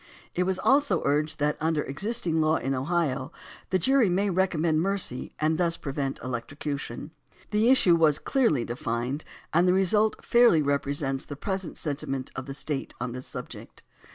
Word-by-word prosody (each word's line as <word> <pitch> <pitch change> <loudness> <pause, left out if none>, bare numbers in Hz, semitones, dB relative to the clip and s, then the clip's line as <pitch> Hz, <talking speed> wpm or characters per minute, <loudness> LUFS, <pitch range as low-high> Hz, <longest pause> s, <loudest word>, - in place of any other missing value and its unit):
It 180 - 0
was 190 -1 +1
also 265 - +2
urged 150 +2 +1
that 150 0 0
under 160 -1 +1
existing 165 - -1
law 155 +1 +3
in 135 -1 -1
Ohio 140 0 -1 0.4
the 190 - +2
jury 250 +3 +3
may 195 +3 +1
recommend 170 -4 +1
mercy 190 -9 -2
and 155 +1 +1
thus 170 -2 +3
prevent 135 -1 -3
electrocution. 140 +3 -5 0.4
The 215 +3 +3
issue 195 -10 +5
was 155 -3 +4
clearly 230 - +1
defined 120 +4 -3 0.3
and 170 +3 +4
the 180 - +4
result 210 +3 +2
fairly 235 -10 +5
represents 140 -1 -1
the 145 - -7
present 190 +3 -4
senti 145 -3 -3
ment 135 -1 -4
of 130 0 -6
the 135 - -5
State 140 0 -4
on 125 0 -3
this 125 +1 -7
subject. - - -9
155 Hz, 165 wpm, -27 LUFS, 140-185 Hz, 0.4 s, issue